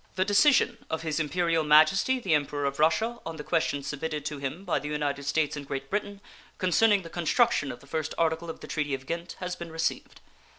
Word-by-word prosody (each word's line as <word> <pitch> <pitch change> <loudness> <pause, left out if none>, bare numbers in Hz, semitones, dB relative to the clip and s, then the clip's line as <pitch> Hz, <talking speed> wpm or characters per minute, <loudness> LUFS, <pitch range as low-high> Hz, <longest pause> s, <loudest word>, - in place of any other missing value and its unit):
The 185 0 +1
decision 235 +3 +4
of 160 0 -3
His 155 -1 -1
Imperial 165 +1 +1
Majesty 155 +12 +5
the 190 -9 0
Emperor 145 -1 0
of 140 0 -2
Russia 215 +10 +2
on 165 0 -6
the 150 - -7
question 145 -4 0
submitted 150 +1 -4
to 150 -1 -4
him 145 +8 -5
by 175 - +1
the 150 - -6
United 145 -2 -2
States 155 +1 0
and 145 -2 -7
Great 135 0 -5
Britain, 205 -1 -3 0.4
concerning 200 +2 +3
the - - -8
construction 175 - +2
of 120 - -10
the - - -16
first 155 +2 -3
article 165 0 0
of 160 - -7
the - - -9
treaty 145 -3 -1
of 135 0 -10
Ghent, 170 +3 -5
has 180 -1 -4
been 170 -2 -8
received. 160 0 -3
160 Hz, 215 wpm, -28 LUFS, 145-180 Hz, 0.4 s, Majesty